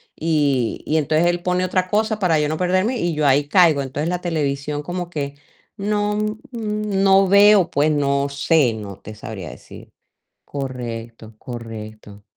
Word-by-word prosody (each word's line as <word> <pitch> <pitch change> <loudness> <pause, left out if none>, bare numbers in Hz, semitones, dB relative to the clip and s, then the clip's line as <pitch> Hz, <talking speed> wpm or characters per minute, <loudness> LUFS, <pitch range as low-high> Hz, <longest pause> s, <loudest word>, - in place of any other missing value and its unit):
Y 145 -7 0
y 155 - 0
entonces 155 +2 +2
él 175 0 0
pone 180 0 0
otra 185 0 0
cosa 215 +1 +1
para 170 -6 +2
yo 150 0 0
no 155 - -2
perderme, 185 +7 +1
y 170 -6 -1
yo 150 -1 +1
ahí 140 +1 +3
caigo. 160 -4 +4
Entonces 145 +5 -3
la 180 - -1
televisión 150 -4 -2
como 175 +2 -5
que 140 -3 -4 0.4
no, 205 +1 0
mm, 215 +1 -2 0.6
no 195 0 +5
veo, 200 -1 +6
pues, 145 +2 +2
no 140 -1 +1
sé, 140 -3 +2
no 100 -3 -8
te 110 - -10
sabría 105 -5 -8
decir - - -14 0.5
Correcto, 115 -5 -6
correcto. 110 -3 -9
150 Hz, 160 wpm, -21 LUFS, 130-180 Hz, 0.6 s, veo